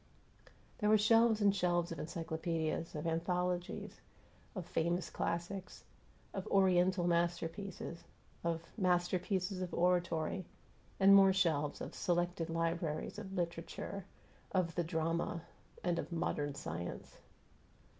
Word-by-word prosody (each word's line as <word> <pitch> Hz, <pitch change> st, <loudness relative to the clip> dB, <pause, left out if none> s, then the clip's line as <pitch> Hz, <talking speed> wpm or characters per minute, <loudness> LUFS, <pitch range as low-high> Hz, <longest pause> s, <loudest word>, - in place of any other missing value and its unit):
There 210 Hz, -2 st, +2 dB
were 215 Hz, -, +7 dB
shelves 225 Hz, +1 st, +5 dB
and 200 Hz, -1 st, +5 dB
shelves 175 Hz, -2 st, +1 dB
of 165 Hz, -, -5 dB
encyclopedias, 165 Hz, 0 st, -2 dB
of 150 Hz, -, -4 dB
anthologies, 175 Hz, +2 st, -1 dB, 0.5 s
of 185 Hz, -4 st, -4 dB
"famous 170 Hz, +3 st, 0 dB
classics," 180 Hz, +3 st, -3 dB, 0.5 s
of -, -, -4 dB
"Oriental 185 Hz, -2 st, +4 dB
masterpieces," 170 Hz, +1 st, -1 dB, 0.4 s
of 165 Hz, -1 st, -1 dB, 0.2 s
"masterpieces 185 Hz, +1 st, +1 dB
of 180 Hz, -, -3 dB
oratory," 175 Hz, 0 st, +1 dB, 0.6 s
and 195 Hz, 0 st, +8 dB
more 195 Hz, -1 st, +8 dB
shelves 155 Hz, -6 st, +1 dB
of -, -, -5 dB
"selected 175 Hz, -1 st, 0 dB
libraries" 165 Hz, +2 st, -1 dB
of 195 Hz, -2 st, -7 dB
"literature," 170 Hz, +2 st, -3 dB, 0.5 s
of 180 Hz, -3 st, +1 dB
"the 175 Hz, -, 0 dB
drama," 165 Hz, 0 st, -1 dB, 0.4 s
and 175 Hz, -1 st, +1 dB
of -, -, -5 dB
"modern 145 Hz, -4 st, -1 dB
science." 85 Hz, -, -6 dB
175 Hz, 115 wpm, -35 LUFS, 165-185 Hz, 0.6 s, and